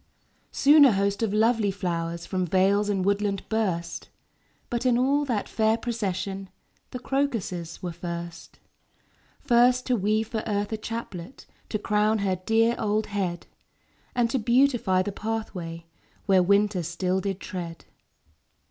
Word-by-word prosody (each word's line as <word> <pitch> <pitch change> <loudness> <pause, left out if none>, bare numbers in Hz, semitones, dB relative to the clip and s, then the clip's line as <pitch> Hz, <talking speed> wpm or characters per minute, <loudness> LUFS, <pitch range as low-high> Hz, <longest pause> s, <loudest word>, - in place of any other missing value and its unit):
Soon 290 +2 +6
a 265 -5 +6
host 200 +1 0
of 225 -3 +1
lovely 220 0 +2
flowers 170 -3 -3
From 185 -1 -1
vales 195 +4 +2
and 195 -2 0
woodland 200 -1 0
burst; 185 -7 -2 0.6
But 240 0 -2
in 250 -2 +3
all 280 +4 +2
that 235 -6 -1
fair 220 0 +1
procession 195 -4 -3 0.4
The - - -6
crocuses 230 - -2
were 175 - -3
first. 170 0 -7 0.8
First 250 -1 +3
to 250 - +2
weave 215 +1 0
for 220 -1 -3
Earth 205 -1 -1
a - - -1
chaplet 215 -2 -7 0.2
To 215 - -1
crown 210 +1 +1
her 195 -3 0
dear 225 +5 +2
old 215 0 0
head; 180 -4 -2 0.7
And 240 -1 +3
to 265 - +1
beautify 235 -5 +3
the 205 - -3
pathway 190 -6 -5 0.4
Where 190 -2 +4
winter 200 +1 +2
still 180 +3 -1
did 195 -1 -3
tread. 175 -5 -7
205 Hz, 140 wpm, -26 LUFS, 185-230 Hz, 0.8 s, Soon